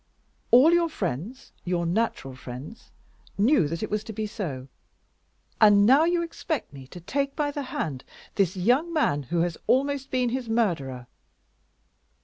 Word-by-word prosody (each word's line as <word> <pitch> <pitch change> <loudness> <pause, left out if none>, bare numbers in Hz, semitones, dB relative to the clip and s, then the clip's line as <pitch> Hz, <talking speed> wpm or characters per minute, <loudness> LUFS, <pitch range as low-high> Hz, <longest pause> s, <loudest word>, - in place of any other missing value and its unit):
"All 270 +8 +7
your 340 -1 +3
friends, 195 - -5
your 175 -1 -1
natural 170 - -1
friends, 130 - -10 0.5
knew 210 - +3
that 165 +5 -4
it - - -4
was 210 0 -1
to 225 - -7
be 215 +1 -3
so. 155 - -5 0.9
And 205 -1 +7
now 275 +8 +6
you 345 0 +1
expect 320 - -4
me 135 -2 -11
to 175 - -11
take 275 +10 -2
by 295 -2 -1
the 290 - -4
hand 135 -5 -4 0.3
this 190 -2 0
young 250 - +2
man 225 - +1
who 170 -1 +1
has 170 -1 -2
almost 275 +1 +1
been 250 -2 0
his 245 -1 -3
murderer!" 160 - -1
215 Hz, 155 wpm, -26 LUFS, 165-270 Hz, 0.9 s, All